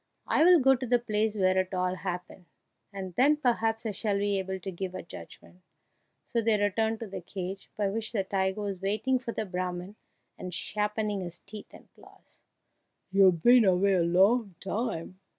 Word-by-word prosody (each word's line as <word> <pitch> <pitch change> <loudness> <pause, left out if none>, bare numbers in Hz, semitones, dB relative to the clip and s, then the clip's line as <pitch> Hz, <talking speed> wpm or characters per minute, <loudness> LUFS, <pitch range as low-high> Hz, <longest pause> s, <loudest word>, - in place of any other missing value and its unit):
I 310 - +3
will 355 0 +7
go 270 0 +5
to 255 0 -3
the 245 +1 +4
place 220 -2 -1
where 185 -2 +2
it 185 +1 -2
all 180 0 0
happened, 180 0 -6 0.5
and 190 -2 -6
then 290 +4 +5
perhaps 225 -5 0
I 220 - -1
shall 205 0 -1
be 200 -1 0
able 190 0 -4
to 190 +1 -6
give 185 +1 -5
a - - -6
judgment." 180 +1 -12 0.6
So 235 - 0
they 220 -2 +2
returned 220 +2 0
to 225 - -4
the 195 - -7
cage, 190 +2 -6
by 205 -1 +1
which 220 +2 -3
the 205 -4 0
tiger 190 +1 -1
was 200 -3 -4
waiting 215 +7 0
for 245 -2 -5
the 220 - -3
Brahman, 180 +1 -4 0.4
and 180 -1 -5
sharpening 210 0 -1
his 175 -1 -6
teeth 210 +1 -11
and - - -15
claws. - - -19 0.7
"You've 185 -4 +4
been 245 0 +7
away 195 0 +3
a 180 - +3
long 195 +4 +3
time!" 195 -3 -4
200 Hz, 185 wpm, -28 LUFS, 185-225 Hz, 0.7 s, will